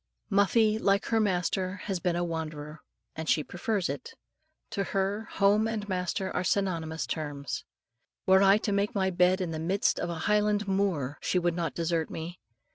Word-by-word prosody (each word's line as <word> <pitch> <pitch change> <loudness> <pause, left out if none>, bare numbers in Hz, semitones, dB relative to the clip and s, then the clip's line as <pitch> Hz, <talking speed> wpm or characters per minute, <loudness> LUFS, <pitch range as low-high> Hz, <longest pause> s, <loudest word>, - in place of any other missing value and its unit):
Muffie, 215 +2 +3
like 200 -1 +2
her 225 - +2
master, 185 -2 0
has 190 -3 -2
been 175 -1 0
a 175 - 0
wanderer, 155 -2 -5 0.4
and 160 0 -4
she 155 - +3
prefers 190 +3 -1
it. 465 0 -6 0.6
To 200 - -1
her, 195 +3 -1
home 205 +2 +4
and 215 -2 -3
master 185 0 -2
are 180 - +1
synonymous 165 -5 -1
terms. 145 -3 -4 0.6
Were 190 0 +6
I 195 +1 +6
to 215 - -2
make 200 +1 0
my 190 -1 +1
bed 180 +1 +3
in 175 -3 -2
the 160 - -3
midst 185 +6 +1
of 175 - -2
a 170 - -3
highland 210 0 +2
moor, 185 -9 0
she - - 0
would 175 -1 +2
not 165 -5 -2
desert 165 -1 0
me. 170 +3 -6
185 Hz, 180 wpm, -29 LUFS, 165-200 Hz, 0.6 s, Were